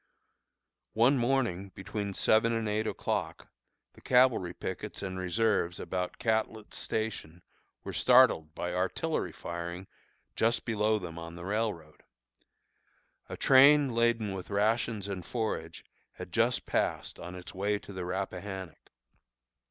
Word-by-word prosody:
One 120 Hz, +5 st, +4 dB
morning, 120 Hz, -7 st, 0 dB
between 100 Hz, 0 st, -4 dB
seven 115 Hz, +1 st, +3 dB
and 115 Hz, -1 st, -1 dB
eight 105 Hz, +1 st, 0 dB
o'clock, -, -, -3 dB, 0.4 s
the -, -, -18 dB
cavalry 125 Hz, -8 st, +3 dB
pickets -, -, -5 dB
and 95 Hz, -1 st, -4 dB
reserves 95 Hz, -1 st, 0 dB
about 90 Hz, -1 st, -3 dB
Catlett's 110 Hz, -1 st, -1 dB
Station 100 Hz, -6 st, -4 dB, 0.4 s
were -, -, -6 dB
startled 125 Hz, -12 st, +5 dB
by 90 Hz, 0 st, -3 dB
artillery 95 Hz, -, -1 dB
firing 85 Hz, +2 st, -6 dB, 0.5 s
just 115 Hz, +1 st, +1 dB
below 110 Hz, -1 st, +1 dB
them 85 Hz, -4 st, -7 dB
on 85 Hz, 0 st, -8 dB
the 85 Hz, 0 st, -8 dB
railroad. 95 Hz, -7 st, -3 dB, 1.3 s
A -, -, -6 dB
train 140 Hz, 0 st, +6 dB
laden 115 Hz, -3 st, +1 dB
with 95 Hz, -2 st, -7 dB
rations 110 Hz, 0 st, 0 dB
and 95 Hz, -3 st, -4 dB
forage 105 Hz, -9 st, -4 dB, 0.3 s
had -, -, -9 dB
just -, -, +1 dB
passed -, -, -1 dB
on 90 Hz, +1 st, -7 dB
its 90 Hz, -1 st, -9 dB
way 100 Hz, +2 st, 0 dB
to 100 Hz, -, -11 dB
the 95 Hz, -1 st, -4 dB
Rappahannock. 95 Hz, -1 st, -5 dB
100 Hz, 130 wpm, -30 LUFS, 90-115 Hz, 1.3 s, train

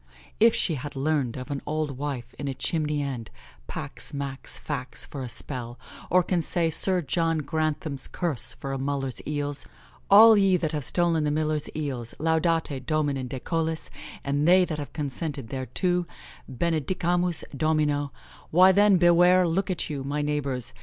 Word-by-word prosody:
if 225 Hz, +1 st, +6 dB
she 170 Hz, -, +1 dB
hath 145 Hz, 0 st, -6 dB
learned 135 Hz, -3 st, 0 dB
of 130 Hz, +3 st, -7 dB
an 140 Hz, -, -3 dB
old 155 Hz, -1 st, -1 dB
wife 130 Hz, -3 st, -5 dB
in 145 Hz, -, -3 dB
a 135 Hz, -, -3 dB
chimney 150 Hz, -2 st, -1 dB
end, 125 Hz, -5 st, -5 dB, 0.4 s
pax, -, -, -5 dB
max, 140 Hz, -1 st, -2 dB
fax, 130 Hz, -4 st, -3 dB
for 140 Hz, -, -7 dB
a 125 Hz, -, -5 dB
spell, 120 Hz, -2 st, -3 dB, 0.3 s
or 180 Hz, 0 st, +4 dB
can 175 Hz, 0 st, 0 dB
say 165 Hz, 0 st, 0 dB
Sir 180 Hz, +2 st, +1 dB
John 165 Hz, +3 st, 0 dB
Grantham's 155 Hz, -2 st, -2 dB
curse 165 Hz, -9 st, -2 dB
for 135 Hz, -1 st, -6 dB
a 135 Hz, -, -3 dB
nuller's 135 Hz, -1 st, -2 dB
eels 145 Hz, -1 st, -2 dB, 0.4 s
'All 220 Hz, +3 st, +9 dB
ye 195 Hz, -2 st, +4 dB
that 160 Hz, -3 st, -2 dB
have 150 Hz, -4 st, -3 dB
stolen 170 Hz, 0 st, +1 dB
the 150 Hz, -, +1 dB
miller's 155 Hz, 0 st, -1 dB
eels, 130 Hz, -6 st, -3 dB
Laudate 160 Hz, -3 st, 0 dB
Dominum 145 Hz, -4 st, 0 dB
de 130 Hz, +1 st, -5 dB
Cœlis, 160 Hz, +3 st, -2 dB, 0.3 s
and 145 Hz, +2 st, 0 dB
they 180 Hz, +1 st, +6 dB
that 155 Hz, -3 st, -4 dB
have 145 Hz, -2 st, -6 dB
consented 145 Hz, -4 st, -4 dB
thereto, 175 Hz, -, -1 dB, 0.4 s
Benedicamus 170 Hz, +4 st, +1 dB
Domino,' 150 Hz, -1 st, +1 dB, 0.4 s
why 185 Hz, +3 st, +7 dB
then, 200 Hz, 0 st, +5 dB
beware, 175 Hz, +1 st, +5 dB
look 185 Hz, +4 st, 0 dB
about 180 Hz, -, -1 dB
you, 145 Hz, -3 st, -4 dB
my 145 Hz, +2 st, -2 dB
neighbours. 140 Hz, -4 st, -2 dB
150 Hz, 165 wpm, -26 LUFS, 140-170 Hz, 0.4 s, All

